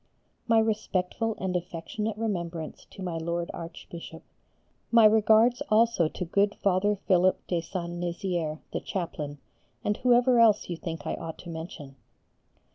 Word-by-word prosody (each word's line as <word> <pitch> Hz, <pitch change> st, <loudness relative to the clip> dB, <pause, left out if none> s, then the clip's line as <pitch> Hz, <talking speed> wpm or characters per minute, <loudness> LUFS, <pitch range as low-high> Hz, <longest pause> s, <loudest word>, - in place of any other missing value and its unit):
My 225 Hz, -1 st, +4 dB
respectful 220 Hz, 0 st, 0 dB
and 185 Hz, -1 st, -2 dB
affectionate 180 Hz, +5 st, -3 dB
remembrance 170 Hz, -7 st, -4 dB
to 190 Hz, -, -10 dB
my 175 Hz, -3 st, -3 dB
Lord 170 Hz, +1 st, -2 dB
Archbishop. 165 Hz, -1 st, -9 dB, 0.7 s
My 230 Hz, -2 st, +7 dB
regards 220 Hz, +3 st, +5 dB
also 215 Hz, -5 st, +4 dB
to 180 Hz, -, -5 dB
good 200 Hz, +4 st, +2 dB
Father 200 Hz, +2 st, +2 dB
Philip 185 Hz, -1 st, +2 dB
de 175 Hz, -2 st, -1 dB
Saint 175 Hz, 0 st, -5 dB
Nizier, 175 Hz, -3 st, -2 dB
the -, -, 0 dB
chaplain, 155 Hz, -6 st, -4 dB, 0.5 s
and 210 Hz, -, +1 dB
whoever 245 Hz, 0 st, +4 dB
else 215 Hz, -5 st, +4 dB
you -, -, -1 dB
think 165 Hz, 0 st, -6 dB
I -, -, -1 dB
ought 160 Hz, -1 st, -6 dB
to 175 Hz, -, -9 dB
mention. 160 Hz, -4 st, -8 dB
185 Hz, 140 wpm, -28 LUFS, 170-215 Hz, 0.7 s, My